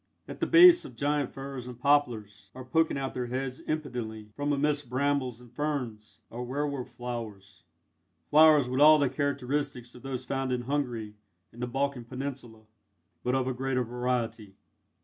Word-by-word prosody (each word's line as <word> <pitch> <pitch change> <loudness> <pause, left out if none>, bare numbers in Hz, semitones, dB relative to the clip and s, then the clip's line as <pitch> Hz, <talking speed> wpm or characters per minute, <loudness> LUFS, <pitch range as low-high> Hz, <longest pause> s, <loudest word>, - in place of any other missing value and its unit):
At - - -8
the - - 0
base 350 +1 +8
of 125 - -10
giant 145 +1 0
firs 135 -2 -7
and 125 -2 -8
poplars, 120 -7 +1
or 130 -1 -8
poking 160 +3 +1
out 135 -1 -3
their 125 -1 -3
heads 130 +1 -3
impudently, 120 -8 -4
from 145 +3 -1
amidst 145 -1 0
brambles 130 -2 0
and 120 -2 -16
ferns, 125 -8 -4
are 120 - -6
werwolf 140 0 -3
flowers 115 -7 -7 0.7
flowers 150 -3 +7
with 130 +1 -1
all 155 +1 +9
the 140 -3 +2
characteristics 140 -2 -2
of 125 - -13
those 130 -2 -5
found 135 -1 -2
in 125 -1 0
Hungary 120 -5 -2 0.4
and 120 - -12
the 125 - -1
Balkan 135 -1 -2
Peninsula, 125 -3 -7 0.6
but 125 +1 +1
of 130 -1 +1
a 130 - 0
greater 130 0 -1
variety. 120 -4 -3
130 Hz, 165 wpm, -29 LUFS, 120-140 Hz, 0.7 s, all